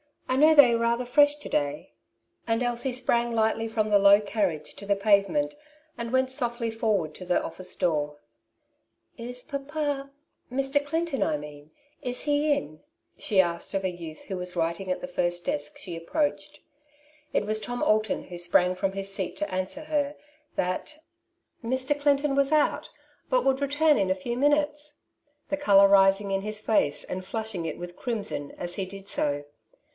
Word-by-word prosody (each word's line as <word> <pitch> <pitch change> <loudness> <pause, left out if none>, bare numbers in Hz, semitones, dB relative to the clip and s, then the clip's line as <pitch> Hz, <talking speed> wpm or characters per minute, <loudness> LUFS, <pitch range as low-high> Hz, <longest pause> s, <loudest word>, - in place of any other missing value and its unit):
I 255 - 0
know 310 +3 +6
they 280 -5 +8
are - - +2
rather 235 +1 +1
fresh 290 +4 +4
to 295 - -9
day/' 145 0 -1 0.6
And 225 +1 +1
Elsie 245 +2 +1
sprang 240 -1 +1
lightly 225 0 +1
from 220 -1 -1
the 205 -1 +5
low 200 +1 +7
carriage 195 -7 -2
to 200 - -9
the 200 0 +2
pave 200 0 +4
^ - - -11
ment, 295 0 -1 0.4
and 235 0 -5
went 260 0 +2
softly 235 -3 -1
forward 210 -8 0
to 185 - -9
the 180 0 +1
office 185 -1 -5
door. 150 -4 0 0.5
'' - - -43
Is 250 0 -3
papa 285 -1 -3 0.2
— - - -43
Mr. 275 +2 +1
Clinton,.! 290 - -1
mean 150 0 -11 0.2
— 290 - -35
^is 250 -1 -1
he 295 +1 +1
in? 155 - -5 0.2
'' - - -45
she 200 -4 +3
asked 170 +1 -3
of 195 - 0
a 185 - 0
youth 165 -3 -9
who 190 - -6
was 180 0 -4
writing 170 +3 -2
at 185 - -1
the 270 - -5
first 175 -9 -1
desk 145 0 -2
she 175 - -6
approached. 290 - -2 0.7
It - - +1
was 215 +1 +1
Tom 245 +3 -4
Alton, 215 0 +1
who 175 - -9
sprang 175 +1 +3
from 190 +1 -2
his 195 0 -2
seat 190 -2 -3
t - - -1
o - - -9
answer 185 +9 -3
her 295 -2 -1 0.4
that 185 +12 -2 0.7
^' 230 - -5
Mr. 260 +3 0
Clinton 285 0 +2
was 280 +1 +2
out, 305 -1 +2 0.4
but - - +2
would 270 +1 +2
return 290 +2 +3
in 190 - +1
a 185 - +2
few 235 +6 -4
minutes,'^ 295 +1 0 0.5
the 290 - 0
colour 200 -8 +6
rising 195 0 +4
in 195 0 0
his 210 +1 -2
face 215 -9 +1
and 185 0 -5
flushing 220 -3 -4
it 160 - -4
with 175 0 -8
crimson 210 - -3
as 175 0 -1
he 195 - -2
did 195 +1 -10
so. 145 -4 -1
220 Hz, 190 wpm, -27 LUFS, 185-275 Hz, 0.7 s, they